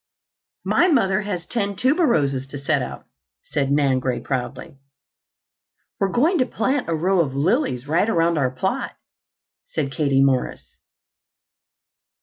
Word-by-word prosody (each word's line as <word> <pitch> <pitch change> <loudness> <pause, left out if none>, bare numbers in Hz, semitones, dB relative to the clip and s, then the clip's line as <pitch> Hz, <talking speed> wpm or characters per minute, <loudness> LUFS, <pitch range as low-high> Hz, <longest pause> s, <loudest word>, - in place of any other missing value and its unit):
"My 355 - +3
mother 215 - +2
has 190 -5 -4
ten 200 -3 -2
tuberoses 205 - +1
to 140 - -6
set 140 - 0
out," - - -7 0.4
said 140 -2 -2
Nan 140 -3 +2
Gray 125 -1 -2
proudly. 130 +1 -5 1.2
"We're 195 - +1
going 310 - +2
to 255 - +3
plant 255 -1 -1
a 165 - +1
row 185 +4 +1
of 140 -5 0
lilies 145 - 0
right 170 +8 +2
around 165 -4 +2
our 130 -2 +2
plot," 190 - -3 0.7
said 140 - -3
Katie 135 -2 +2
Morris. 135 -2 -1
165 Hz, 130 wpm, -22 LUFS, 135-225 Hz, 1.2 s, My